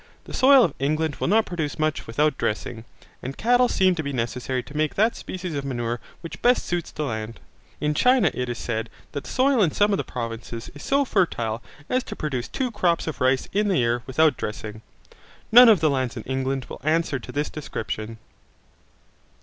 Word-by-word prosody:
The -, -, -11 dB
soil 270 Hz, -1 st, +7 dB
of 165 Hz, -, +1 dB
England 155 Hz, +2 st, 0 dB
will -, -, -1 dB
not 220 Hz, +4 st, +4 dB
produce 160 Hz, -5 st, -3 dB
much 155 Hz, -1 st, -1 dB
without 150 Hz, +6 st, +1 dB
dressing, 110 Hz, +1 st, -3 dB, 0.4 s
and 130 Hz, +2 st, -6 dB
cattle 245 Hz, +2 st, +4 dB
seem 185 Hz, -1 st, +3 dB
to 170 Hz, -, -2 dB
be 140 Hz, -2 st, -4 dB
necessary 125 Hz, +1 st, -2 dB
to 145 Hz, -, -13 dB
make 155 Hz, 0 st, 0 dB
that 220 Hz, +3 st, +2 dB
species 180 Hz, -2 st, -6 dB
of 140 Hz, -1 st, -3 dB
manure 120 Hz, -3 st, -2 dB, 0.2 s
which 165 Hz, -, -8 dB
best 245 Hz, +1 st, +3 dB
suits 175 Hz, -1 st, -2 dB
the 155 Hz, -, -4 dB
land. 110 Hz, -4 st, -4 dB, 0.4 s
In 150 Hz, 0 st, 0 dB
China 250 Hz, -, +4 dB
it 125 Hz, -1 st, -3 dB
is 120 Hz, -, -3 dB
said 115 Hz, -1 st, -3 dB, 0.2 s
that 140 Hz, -, -5 dB
the -, -, -8 dB
soil 260 Hz, -2 st, +3 dB
in 180 Hz, -, +4 dB
some 205 Hz, +7 st, +2 dB
of -, -, +2 dB
the -, -, -1 dB
provinces 115 Hz, -1 st, -6 dB
is 145 Hz, -, -11 dB
so 280 Hz, +1 st, +2 dB
fertile 120 Hz, -, 0 dB, 0.3 s
as 255 Hz, 0 st, 0 dB
to -, -, -7 dB
produce 130 Hz, -5 st, -3 dB
two 255 Hz, -3 st, -2 dB
crops 175 Hz, -5 st, +1 dB
of 155 Hz, -4 st, -5 dB
rice 130 Hz, 0 st, +2 dB
in 210 Hz, +1 st, +2 dB
the 190 Hz, -3 st, +2 dB
year 120 Hz, 0 st, +1 dB
without 155 Hz, +4 st, +3 dB
dressing. 105 Hz, 0 st, -5 dB, 0.7 s
None 245 Hz, +1 st, +10 dB
of 205 Hz, -7 st, +5 dB
the 155 Hz, -, +4 dB
lands 130 Hz, -2 st, -1 dB
in 110 Hz, -, -5 dB
England 130 Hz, 0 st, -2 dB
will -, -, -9 dB
answer 155 Hz, -2 st, +1 dB
to 115 Hz, -, -9 dB
this 145 Hz, +1 st, -2 dB
description. 115 Hz, -6 st, -5 dB
150 Hz, 205 wpm, -24 LUFS, 120-185 Hz, 0.7 s, None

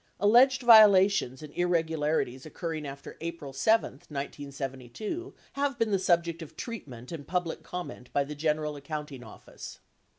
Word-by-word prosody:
(Alleged 250 Hz, +6 st, +5 dB
vio 220 Hz, -3 st, +10 dB
lations 190 Hz, -9 st, +2 dB
and 150 Hz, -, -10 dB
irregularities 160 Hz, -6 st, 0 dB
occurring 155 Hz, -1 st, -5 dB
after 135 Hz, 0 st, -9 dB
April 165 Hz, -4 st, -6 dB
7, 220 Hz, -2 st, +1 dB
1972 140 Hz, -, -6 dB, 0.2 s
have 280 Hz, -2 st, -1 dB
been 225 Hz, -2 st, 0 dB
the 195 Hz, -, +2 dB
subject 170 Hz, -2 st, +1 dB
of 160 Hz, -, -10 dB
treatment 135 Hz, -, -7 dB
and 155 Hz, -4 st, -7 dB
public 180 Hz, -2 st, -2 dB
comment 180 Hz, -8 st, -7 dB
by 140 Hz, -, +2 dB
the 145 Hz, +2 st, -7 dB
General 150 Hz, 0 st, -1 dB
Accounting 145 Hz, -2 st, -6 dB
Office.) 110 Hz, -, -11 dB
160 Hz, 140 wpm, -28 LUFS, 140-195 Hz, 0.2 s, vio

